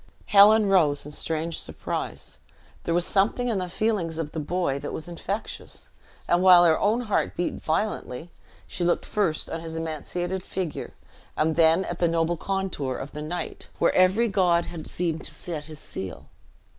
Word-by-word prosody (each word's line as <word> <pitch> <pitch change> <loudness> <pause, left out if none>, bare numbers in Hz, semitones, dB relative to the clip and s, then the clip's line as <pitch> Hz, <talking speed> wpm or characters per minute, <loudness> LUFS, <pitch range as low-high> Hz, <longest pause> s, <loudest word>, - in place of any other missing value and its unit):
Helen 210 +1 +7
rose 160 -9 +3
in 150 - -8
strange 160 +2 -3
surprise; - - -5 0.5
there 170 - 0
was 175 0 +3
something 225 +5 +1
in 215 -4 0
the 180 -1 -3
feelings 185 -5 -1
of 155 -2 -3
the 160 - -4
boy 155 -3 -1
that - - -5
was 160 - -5
infectious; 190 +5 -6 0.4
and 175 +1 +3
while 180 -2 +8
her 160 -2 +4
own 220 +4 +2
heart 215 -4 -1
beat 175 - -2
violently, 160 -3 -2 0.3
she 180 - -4
looked 175 0 +1
first 190 -7 0
on 165 - -4
his 165 0 -7
emaciated 175 +3 -3
figure, 180 -3 -5 0.4
and 155 +1 +2
then 165 +3 +5
at 175 - -5
the 175 - +3
noble 165 +1 +1
contour 185 -8 -2
of 135 - -6
the 150 - -6
knight, 170 +4 -5
"where - - +3
every 190 +6 +4
god 180 -4 +2
had 165 -3 -8
seemed 165 -2 -2
to - - -6
set 155 -4 -6
his 155 -1 -10
seal." 95 - -7
175 Hz, 175 wpm, -26 LUFS, 160-190 Hz, 0.5 s, while